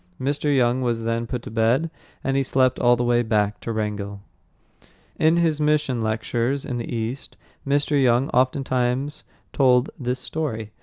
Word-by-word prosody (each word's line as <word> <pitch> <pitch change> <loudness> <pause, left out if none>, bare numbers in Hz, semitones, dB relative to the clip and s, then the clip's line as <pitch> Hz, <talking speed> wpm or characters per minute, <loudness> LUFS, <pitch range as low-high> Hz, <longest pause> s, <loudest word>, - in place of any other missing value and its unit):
Mr. 145 +3 -1
Young 125 0 +2
was 120 -2 -1
then 115 +1 -1
put 125 0 -4
to - - -8
bed, 115 +8 +1 0.3
and 135 - 0
he 135 - +3
slept 130 -1 +2
all 120 0 +5
the 120 - -1
way 120 0 +3
back 105 -3 0
to 115 - -5
Wrangell. 100 -2 -4 1.0
In 160 +2 +4
his 160 -3 +1
mission 150 -5 +1
lectures 115 +4 -1
in 125 - -3
the 115 - -5
East, 115 +3 -4 0.3
Mr. 145 0 +2
Young 125 +1 +3
oftentimes 130 +2 0 0.3
told 125 -1 +3
this 125 -1 -2
story. 125 -6 -4
125 Hz, 160 wpm, -23 LUFS, 115-135 Hz, 1.0 s, all